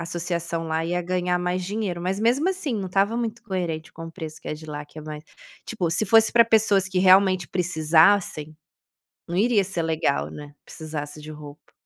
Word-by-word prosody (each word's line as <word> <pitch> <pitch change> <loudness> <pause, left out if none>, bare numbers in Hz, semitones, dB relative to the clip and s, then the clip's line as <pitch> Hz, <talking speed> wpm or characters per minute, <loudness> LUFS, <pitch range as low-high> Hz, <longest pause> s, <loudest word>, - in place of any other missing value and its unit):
associação 170 -1 -3
lá 160 0 -1
ia 175 +1 -1
ganhar 180 0 0
mais 180 +1 -1
dinheiro, 195 -2 -3
mas 185 +3 -2
mesmo 250 - +2
assim 345 -10 -2
não 195 -3 -3
estava 200 +5 +1
muito 235 0 -4
coerente 175 -7 -4
com 165 0 -8
o - - -8
preço 160 -3 -8
que - - -8
é - - -2
de 155 +1 -12
lá, 150 -1 -6
que 155 - -13
é - - -8
mais 150 0 -8 0.4
tipo, 180 -7 -2
se 200 +5 0
fosse 225 +2 +5
pra 235 0 +6
pessoas 210 -4 +3
que 185 -1 -1
realmente 185 -2 +5
precisassem, 160 -1 +2 0.7
não 175 +1 -3
iria 215 -1 +3
ser 180 -3 -3
legal, 160 -3 0
né, 145 -1 -10
precisasse 150 -1 -7
de 155 +1 -9
roupa. 150 -1 -12
180 Hz, 195 wpm, -24 LUFS, 160-200 Hz, 0.7 s, pra